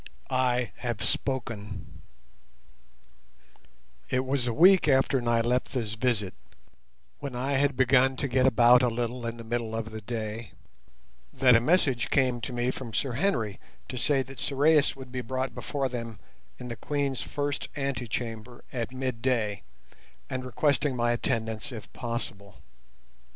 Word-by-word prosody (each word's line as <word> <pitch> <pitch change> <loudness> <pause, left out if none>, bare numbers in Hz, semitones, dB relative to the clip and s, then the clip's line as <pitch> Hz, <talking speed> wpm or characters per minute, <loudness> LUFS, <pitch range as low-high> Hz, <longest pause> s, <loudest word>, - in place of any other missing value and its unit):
I 125 -1 +1
HAVE 120 -4 -3
SPOKEN 105 -7 -3 2.1
It 130 +1 +1
was 130 -2 0
a - - +1
week 175 +5 +6
after 135 -1 +3
Nyleptha's 120 -1 0
visit, 110 -5 0 0.9
when 140 -3 -5
I 130 +3 -1
had 140 -1 +2
begun 130 0 +4
to 140 - -1
get 130 0 +3
about 120 +1 +6
a 125 - +3
little 120 +1 -2
in 115 0 -4
the 115 - -8
middle 115 -1 -2
of 110 0 -4
the 110 0 -6
day, 110 0 -5 0.8
that 125 -2 +5
a 115 - +5
message 135 -5 +2
came 130 -3 +2
to 130 - -4
me 120 +1 0
from 120 -4 -7
Sir 135 - 0
Henry 120 - 0 0.3
to - - -5
say 135 0 +2
that 135 +1 -11
Sorais 150 +2 +3
would 130 -2 -10
be 125 0 -3
brought 130 +1 -3
before 135 +3 -2
them 115 -3 -5 0.4
in 125 - -7
the 120 - -4
Queen's 140 0 -1
first 145 -1 -3
antechamber 120 -3 -4
at 120 -2 -3
midday, 125 -5 -1 0.7
and 130 0 -2
requesting 140 +2 +1
my 120 -1 +2
attendance 115 -1 -1
if 110 -4 -9
possible. 115 -4 -5
125 Hz, 145 wpm, -28 LUFS, 115-135 Hz, 2.1 s, week